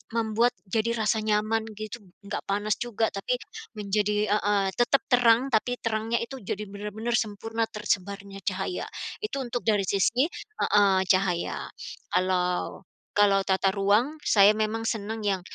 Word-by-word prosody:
membuat 230 +1 +2
jadi 220 +4 0
rasa 220 0 +1
nyaman 215 +1 +1
gitu, 215 +2 -6 0.2
enggak 200 +1 -4
panas 205 +1 0
juga 225 -2 0
tapi, 200 +5 -1 0.4
menjadi 210 0 0
heeh 205 -2 +2
tetap 255 +3 +3
terang 245 +1 +5
tapi 245 +2 +1
terangnya 225 0 -1
itu 265 +3 -7
jadi 200 +2 -3
benar-benar 210 +3 -5
sempurna, 225 +1 -2
tersebarnya 200 -2 -3
cahaya. 195 - -2 0.3
Itu 420 -11 -3
untuk 240 -1 -4
dari 205 -2 +3
sisi 230 +8 +2 0.3
heeh 195 -2 +4
cahaya. 185 -2 +1 0.4
Kalau 180 -1 0 0.3
kalau 205 -1 +5
tata 190 0 +2
ruang, 210 +10 +2
saya 200 -1 +7
memang 215 +1 -1
senang 220 0 -3
yang 195 -3 0
210 Hz, 135 wpm, -27 LUFS, 200-225 Hz, 0.4 s, saya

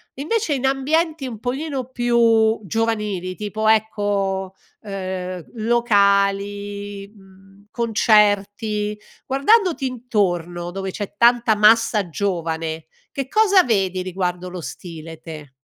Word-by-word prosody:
invece 320 - -1
in 265 - -2
ambienti 295 +2 0
un 230 -4 -7
pochino 265 +2 -3
più 230 -3 +3
giovanili 210 -3 -2
tipo 215 +2 -3
ecco, 200 -3 0 0.3
ehm, 185 -3 -5
locali, 200 -2 +1
mhmm, 195 -1 -20
concerti 210 -2 +1 0.3
guardandoti 325 - +2
intorno, 175 -8 -2
dove 190 +1 -4
c'è 205 +1 -6
tanta 235 -2 +4
massa 215 -2 +4
giovane 165 -3 -3 0.3
che 275 -1 -3
cosa 405 -2 +5
vedi 190 - 0
riguardo 180 -1 -3
lo 180 - -7
stile 165 -1 -9
te? 155 -4 -9
205 Hz, 105 wpm, -21 LUFS, 190-235 Hz, 0.3 s, cosa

